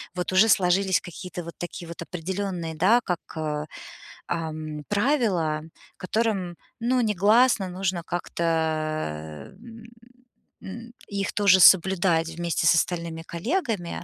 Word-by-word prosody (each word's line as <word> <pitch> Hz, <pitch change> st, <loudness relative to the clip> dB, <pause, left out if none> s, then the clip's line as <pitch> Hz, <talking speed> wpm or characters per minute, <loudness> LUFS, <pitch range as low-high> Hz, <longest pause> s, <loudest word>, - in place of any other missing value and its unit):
вот 180 Hz, 0 st, -3 dB
уже 190 Hz, +4 st, +6 dB
сложились 190 Hz, 0 st, +3 dB
какие-то 180 Hz, 0 st, -8 dB
вот 170 Hz, 0 st, -8 dB
такие 175 Hz, 0 st, -7 dB
вот 170 Hz, 0 st, -9 dB
определённые, 180 Hz, -1 st, -4 dB
да, 190 Hz, +10 st, +4 dB
как, 180 Hz, -2 st, -1 dB, 0.2 s
э 150 Hz, -1 st, -2 dB, 0.6 s
эм 155 Hz, -2 st, -4 dB
правила, 205 Hz, -, +1 dB, 0.4 s
которым, 195 Hz, -3 st, -1 dB, 0.4 s
ну, 255 Hz, -, +3 dB
негласно 215 Hz, 0 st, +3 dB
нужно 185 Hz, -1 st, -2 dB
как-то, 175 Hz, -1 st, -4 dB, 1.1 s
э -, -, -19 dB
м 230 Hz, +2 st, -13 dB, 0.8 s
м 230 Hz, +4 st, -9 dB, 0.2 s
их 200 Hz, -1 st, -3 dB
тоже 200 Hz, -2 st, +5 dB
соблюдать 180 Hz, -2 st, +5 dB
вместе 170 Hz, 0 st, -1 dB
с 170 Hz, -, +6 dB
остальными 170 Hz, -1 st, -1 dB
коллегами. 215 Hz, -, -3 dB
180 Hz, 120 wpm, -25 LUFS, 170-205 Hz, 1.1 s, уже